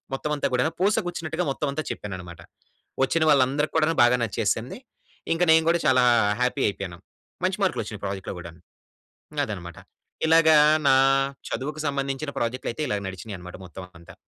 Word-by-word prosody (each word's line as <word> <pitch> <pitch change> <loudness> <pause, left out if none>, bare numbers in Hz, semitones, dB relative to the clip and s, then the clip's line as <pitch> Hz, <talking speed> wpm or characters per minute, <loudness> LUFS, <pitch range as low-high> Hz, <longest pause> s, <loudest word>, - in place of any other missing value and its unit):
మొత్తం 150 +3 -4
అంతా 145 - 0
కూడా 125 0 +2 0.2
పూస 200 +3 +3
గుచ్చినట్టుగా 165 -1 -3
మొత్తం 145 +2 -3
అంతా 155 +1 -3
చెప్పానన్నమాట. 90 -4 -7 0.6
వచ్చిన 155 +5 +1
వాళ్ళందరికి 140 +1 +2
కూడా 160 +1 +2
బాగా 120 +1 +4
నచ్చేసింది. 110 +2 -2 0.6
ఇంక 165 - +1
నేను 160 0 +6
గూడా 170 +1 +3
చాలా 130 -1 +4 0.4
హ్యాపీ 125 +2 0
అయిపోయాను. 95 -3 -7 0.5
మంచి - - 0
మార్కులు - - +1
వచ్చినాయి - - -9
ప్రాజెక్ట్‌లో 95 0 -4
కూడాను. 85 -1 -11 0.9
అదన్నమాట. 90 -7 -7 0.5
ఇలాగ 160 0 +5 0.4
నా 135 - +6 0.5
చదువుకు 150 +3 -4
సంబంధించిన 140 +1 -2
ప్రాజెక్ట్‌లు 120 +2 -2
అయితే 155 - -5
ఇలా 105 - 0
నడిచినాయి 95 +2 -7
అన్నమాట 90 0 -10
మొత్తం 90 +2 -10 0.2
అంతా. 85 +3 -15
130 Hz, 150 wpm, -25 LUFS, 95-155 Hz, 0.9 s, నేను